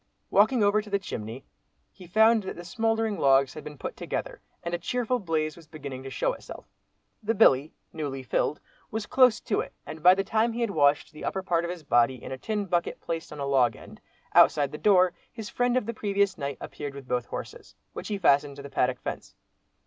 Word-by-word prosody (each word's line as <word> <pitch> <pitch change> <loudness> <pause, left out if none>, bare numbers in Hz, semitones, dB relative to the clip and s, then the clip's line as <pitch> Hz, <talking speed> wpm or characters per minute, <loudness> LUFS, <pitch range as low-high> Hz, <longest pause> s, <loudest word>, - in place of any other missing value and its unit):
Walking 220 +3 +4
over 205 +1 +3
to 210 - -12
the 200 - +2
chimney, 115 - -7 0.5
he 185 -3 -14
found 220 +4 +5
that 190 - -6
the 175 - -9
smouldering 225 +2 0
logs 135 -1 +4
had 155 - -9
been 150 -1 -9
put - - -6
together, - - -5 0.2
and 170 - -4
a 175 - -1
cheerful 245 +6 -1
blaze 155 -5 -1
was 165 -2 -16
beginning 140 -4 -7
to 135 - -7
show - - 0
itself. - - -10 0.6
The 225 +1 0
billy, 140 -4 +4 0.2
newly 140 -4 -4
filled, 140 +3 0 0.3
was 220 -1 -3
close 250 -2 +4
to 215 - -1
it, - - -4
and 155 - -8
by 180 +3 +7
the 195 - 0
time 220 +3 +1
he 240 - -3
had 230 -3 0
washed 145 -3 +2
the 155 - -11
upper 190 -1 -2
part 170 -2 +1
of - - -4
his 175 -2 -6
body 120 -2 +3
in 125 - -9
a 130 - -4
tin 210 +3 -2
bucket 175 -2 -1
placed 165 0 -5
on 150 - -8
a 140 - -2
log 130 -5 +3
end, - - -14 0.3
outside 145 -2 +5
the 150 - -7
door, 185 -3 +4 0.2
his 220 -3 -7
friend 245 0 +1
of 255 - 0
the 235 - -3
previous 200 -2 0
night 140 -1 -4
appeared 145 -2 -7
with 140 -2 -10
both 125 -1 -1
horses, - - -8 0.2
which - - -6
he 210 - -2
fastened 145 -5 +3
to 140 - -10
the 140 - -9
paddock 125 0 +1
fence. - - -6
170 Hz, 225 wpm, -27 LUFS, 140-210 Hz, 0.6 s, by